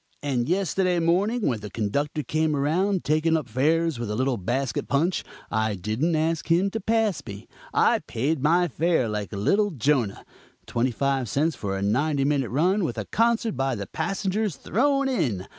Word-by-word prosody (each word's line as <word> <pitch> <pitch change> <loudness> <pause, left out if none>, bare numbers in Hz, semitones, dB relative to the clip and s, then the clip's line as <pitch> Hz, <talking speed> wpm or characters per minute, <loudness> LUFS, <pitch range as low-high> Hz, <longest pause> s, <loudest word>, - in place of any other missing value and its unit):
And 130 -2 -1
yesterday 185 -1 +1
morning, 195 +8 +1
when 120 -4 0
the 105 0 -7
conductor 140 +9 -2
came 155 +3 0
around 175 +7 +1
taking 155 +2 +2
up 150 -5 -4
fares 155 +4 +1
with 120 -3 -3
a 105 - -2
little 130 +2 +1
basket 120 +7 -2
punch, 165 +6 +1 0.3
I 110 -1 0
didn't 110 - -1
ask 160 +1 0
him 175 +4 +2
to 225 - -3
pass 220 -4 +1
me; 100 -2 -9 0.2
I - - +3
paid 140 +5 -2
my 170 +5 +3
fare 165 -4 +1
like 105 -2 -4
a 105 - -5
little 205 - +2
Jonah 135 - 0 0.4
twenty 120 +2 0
five 135 0 -1
cents 150 +7 +1
for 95 -4 -3
a 95 - -3
ninety 135 +7 +1
minute 140 -4 +1
run, 180 - +2
with 165 - -2
a - - -3
concert 230 -3 +1
by 135 0 0
the 100 -2 -5
passengers 195 - -2
thrown 275 - +1
in. 130 - -1
150 Hz, 180 wpm, -25 LUFS, 120-180 Hz, 0.4 s, I